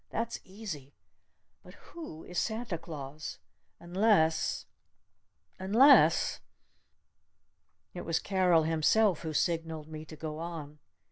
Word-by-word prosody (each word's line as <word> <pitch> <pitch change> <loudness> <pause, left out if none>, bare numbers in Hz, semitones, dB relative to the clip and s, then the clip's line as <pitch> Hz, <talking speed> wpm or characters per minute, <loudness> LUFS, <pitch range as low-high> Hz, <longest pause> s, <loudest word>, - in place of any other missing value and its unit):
That's 230 +1 -3
easy! 185 -9 -8 0.7
But - - -15
who 310 - -10
is 180 - -3
Santa 220 -6 -2
Claus? 150 -2 -7 0.4
Unless 175 -3 +2 0.9
unless 230 +10 +5 0.7
?" - - -49
It 175 - -6
was 165 - 0
Carol 180 -4 +3
himself 165 +4 +3
who 160 - -4
signaled 160 -1 -1
me 155 -1 -7
to 155 - -10
go 155 0 -6
on. 160 -3 -7
165 Hz, 110 wpm, -30 LUFS, 155-200 Hz, 0.9 s, unless